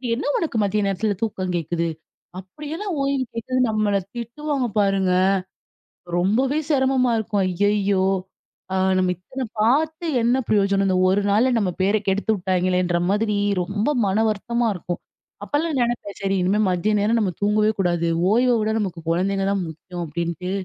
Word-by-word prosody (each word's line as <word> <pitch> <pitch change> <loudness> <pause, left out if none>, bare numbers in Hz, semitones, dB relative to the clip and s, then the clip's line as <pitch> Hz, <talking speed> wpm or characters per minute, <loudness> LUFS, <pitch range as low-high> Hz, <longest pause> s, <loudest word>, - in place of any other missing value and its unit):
"என்ன 260 - -4
உனக்கு 310 -9 -2
மதிய 205 +1 0
நேரத்தில 200 +2 0
தூக்கம் 185 -5 -2
கேட்குது? 170 0 -1 0.5
அப்படியென்ன 300 - -7 0.2
ஓய்வு 275 -1 0
கேட்குது?" 255 +3 -2
நம்மள 210 -2 +1 0.2
திட்டுவாங்க 260 +3 -2
பாருங்க. 195 -2 +2 1.1
ரொம்பவே 255 - +2
சிரமமா 265 -3 +2
இருக்கும். 205 -2 0
"ஐயய்யோ, 200 0 +1 0.7
அ - - 0 0.2
நம்ம 185 -1 +2
இத்தனை 255 +8 -6 0.2
பார்த்து 315 +8 +1 0.2
என்ன 240 +3 +2
பிரயோஜனம்? 195 -1 +2
இந்த 185 -1 +2
ஒரு 200 +2 +2
நாள்ல 225 +6 +3
நம்ம 185 -4 0
பேரை 205 +2 +2
கெடுத்து 200 +3 +1
விட்டாங்கெளே!"ன்ற 180 -1 +1
மாதிரி 210 0 +1 0.3
ரொம்ப 205 +6 -2 0.2
மனவருத்தமா 220 +3 0
இருக்கும். 175 0 -5 0.4
அப்போலாம் 300 0 -1
நினைப்பேன். 235 -4 -2
"சரி, 195 0 0
இனிமேல் 205 +3 +2
மதிய 190 +4 0
நேரம் 225 +3 +2
நம்ம 185 -4 0
தூங்கவே 210 +1 +3
கூடாது. 175 -2 0 0.2
ஓய்வவுட, 235 -2 +3
நமக்கு 180 -5 -3
கொழந்தைங்க 195 +3 0
தான் 195 -2 0
முக்கியம்." 175 +2 -7
அப்படின்ட்டு 170 +3 -3
205 Hz, 140 wpm, -22 LUFS, 185-235 Hz, 1.1 s, நாள்ல